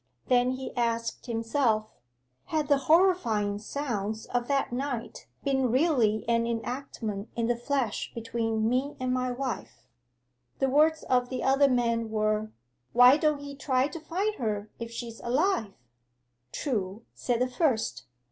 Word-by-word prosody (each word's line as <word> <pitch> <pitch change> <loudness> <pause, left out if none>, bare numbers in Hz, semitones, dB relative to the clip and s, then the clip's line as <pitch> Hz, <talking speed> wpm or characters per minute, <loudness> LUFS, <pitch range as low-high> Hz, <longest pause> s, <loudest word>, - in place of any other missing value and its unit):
Then 250 0 +4
he 260 0 -6
asked 230 0 -1
himself, 225 -1 +1 0.6
had 310 -2 -1
the 285 -1 +5
horrifying 240 - +3
sounds 220 -3 -3
of 245 -1 -2
that 275 -3 0
night 245 -2 -4 0.2
been 265 -2 +1
really 250 -7 +2
an 230 0 +2
enactment 230 -3 -4
in 235 - 0
the 240 +1 +1
flesh 240 -2 -2
between 225 -1 -1
me 255 +4 0
and 255 0 0
my 255 0 0
wife? 245 - -5 0.7
'The 270 - +1
words 310 +3 +4
of 250 -1 +1
the 255 - -3
other 275 +1 +4
man 235 -2 +1
were: 215 0 0 0.4
'"Why 245 +2 +8
don't 300 -1 +1
he 285 0 -7
try 265 -1 +1
to 330 - -7
find 380 +7 -1
her 210 -2 -2
if 230 -1 -5
she's 230 -1 -7
alive?" 255 - 0 0.8
'"True," 215 -5 -3
said 240 -2 -1
the 250 - +2
first. 240 - 0
245 Hz, 145 wpm, -28 LUFS, 225-275 Hz, 0.8 s, Why